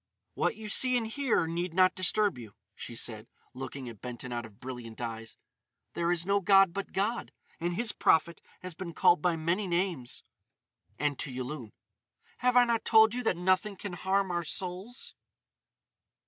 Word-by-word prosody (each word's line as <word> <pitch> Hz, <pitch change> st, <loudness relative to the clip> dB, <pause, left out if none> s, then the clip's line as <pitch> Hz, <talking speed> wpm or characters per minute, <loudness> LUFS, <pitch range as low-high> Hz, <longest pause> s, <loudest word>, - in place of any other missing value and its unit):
"What -, -, 0 dB
you 220 Hz, -1 st, -8 dB
see 255 Hz, +4 st, +4 dB
and 230 Hz, -, -1 dB
hear 240 Hz, -, +1 dB
need 170 Hz, +1 st, -3 dB
not 185 Hz, 0 st, +5 dB
disturb 200 Hz, +3 st, +2 dB
you," 110 Hz, -4 st, -11 dB, 0.2 s
she 120 Hz, -, -7 dB
said, 110 Hz, -1 st, -3 dB, 0.3 s
looking 130 Hz, 0 st, -6 dB
at 115 Hz, -4 st, -10 dB
Benton 125 Hz, 0 st, -6 dB
out 120 Hz, -1 st, -4 dB
of 100 Hz, -2 st, -21 dB
brilliant 125 Hz, -3 st, -8 dB
eyes. 115 Hz, -2 st, -5 dB, 0.6 s
"There 170 Hz, 0 st, 0 dB
is 175 Hz, -1 st, 0 dB
no 200 Hz, +1 st, +3 dB
god 195 Hz, -1 st, +5 dB
but 200 Hz, +1 st, -4 dB
God; 215 Hz, +5 st, -1 dB, 0.3 s
and 175 Hz, +1 st, -1 dB
His 235 Hz, +3 st, +1 dB
prophet 170 Hz, +1 st, +2 dB, 0.2 s
has 185 Hz, -1 st, -6 dB
been 170 Hz, 0 st, -7 dB
called 175 Hz, -, +5 dB
by 175 Hz, 0 st, +2 dB
many 170 Hz, +5 st, -1 dB
names." 170 Hz, -8 st, -2 dB, 0.7 s
And 145 Hz, -2 st, -1 dB
to 135 Hz, -, -3 dB
Yulun: 125 Hz, -2 st, -6 dB, 0.7 s
"Have 250 Hz, 0 st, +3 dB
I 245 Hz, -, +7 dB
not 235 Hz, -1 st, 0 dB
told 220 Hz, 0 st, +6 dB
you 250 Hz, -, -2 dB
that 180 Hz, -, +2 dB
nothing 185 Hz, +3 st, +1 dB
can 195 Hz, 0 st, -6 dB
harm 190 Hz, +2 st, 0 dB
our 175 Hz, 0 st, -1 dB
souls?" 185 Hz, +8 st, -6 dB
175 Hz, 175 wpm, -30 LUFS, 130-200 Hz, 0.7 s, I